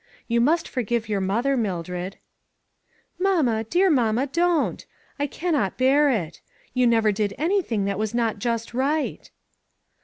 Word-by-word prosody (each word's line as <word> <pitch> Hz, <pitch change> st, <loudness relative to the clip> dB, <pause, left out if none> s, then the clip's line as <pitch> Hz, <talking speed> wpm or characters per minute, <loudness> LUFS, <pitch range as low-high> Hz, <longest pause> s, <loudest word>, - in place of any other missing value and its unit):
You 235 Hz, 0 st, +2 dB
must 325 Hz, +7 st, +2 dB
forgive 235 Hz, -2 st, -2 dB
your 205 Hz, -2 st, -1 dB
mother, 230 Hz, +9 st, +1 dB
Mildred." 180 Hz, -4 st, -3 dB, 1.0 s
44 390 Hz, +1 st, +2 dB
Mamma, 225 Hz, -3 st, +1 dB
dear 360 Hz, -, +3 dB
mamma, 240 Hz, -2 st, +2 dB
don't! 340 Hz, +2 st, 0 dB, 0.4 s
I 285 Hz, -, 0 dB
cannot 295 Hz, -, -1 dB
bear 280 Hz, +3 st, +4 dB
it. 175 Hz, -, -2 dB, 0.3 s
You 255 Hz, -1 st, +3 dB
never 225 Hz, -2 st, +3 dB
did 205 Hz, -1 st, -2 dB
anything 315 Hz, -, 0 dB
that 200 Hz, 0 st, -2 dB
was 220 Hz, +1 st, -2 dB
not 225 Hz, -3 st, 0 dB
just 230 Hz, +1 st, -2 dB
right." 285 Hz, +5 st, -1 dB
235 Hz, 145 wpm, -24 LUFS, 210-285 Hz, 1.0 s, bear